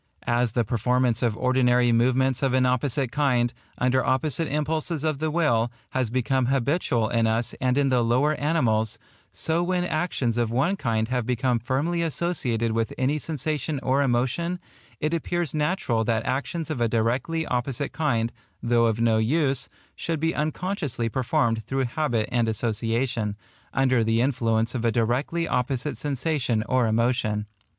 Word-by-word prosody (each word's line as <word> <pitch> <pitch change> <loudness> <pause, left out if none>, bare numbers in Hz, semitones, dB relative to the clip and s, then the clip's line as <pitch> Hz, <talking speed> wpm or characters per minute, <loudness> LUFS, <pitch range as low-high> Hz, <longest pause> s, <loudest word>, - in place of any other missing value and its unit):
As 120 -1 +1
the 120 - +2
performance 125 +2 +1
of 115 -3 0
ordinary 125 -1 +3
movements 130 +2 +2
of 135 -2 +1
an 130 0 +3
opposite 125 0 0
kind, 125 -5 +1 0.2
under 130 +1 +2
opposite 150 +4 +1
impulses 155 +1 -1
of 155 -3 0
the 155 0 0
will, 120 -8 +1 0.2
has 130 -3 0
become 130 +1 0
habitual 130 -3 +1
in 115 -1 +2
us 115 +1 0
and 125 +1 +1
in 140 -1 +3
the 125 -2 +3
lower 125 +6 +2
animals, 120 -9 +1 0.3
so 165 +1 0
when 180 0 0
actions 150 -9 -1
of 120 -2 +1
one 135 - +1
kind 115 - -1
have 125 -2 -1
become 125 -1 +1
firmly 145 +9 -1
associated 140 -9 0
with 115 0 -1
any 140 +4 +1
sensation 155 -1 -2
or 135 +2 +2
emotion, 135 +8 0 0.4
it 155 +2 -1
appears 170 -1 -1
natural 150 -7 0
that 110 0 0
actions 150 +5 -2
of 130 -6 -3
a 120 - +3
directly 125 +9 0
opposite 125 +2 -2
kind, 120 -7 0 0.3
though 120 -1 +3
of 110 0 -1
no 115 -1 +3
use, 135 +2 +1 0.3
should 165 -2 -2
be 160 +2 0
unconsciously 155 - -2
performed 115 -2 0
through 135 0 -1
habit 120 -4 -1
and 120 -2 +1
association, 115 0 -1 0.4
under 130 -3 +2
the 115 +1 +1
influence 115 -3 +1
of 120 -3 -3
a 115 - +2
directly 125 +9 0
opposite 125 +3 -1
sensation 140 -5 -1
or 130 -2 +2
emotion. 110 -2 +1
125 Hz, 160 wpm, -25 LUFS, 115-150 Hz, 0.4 s, ordinary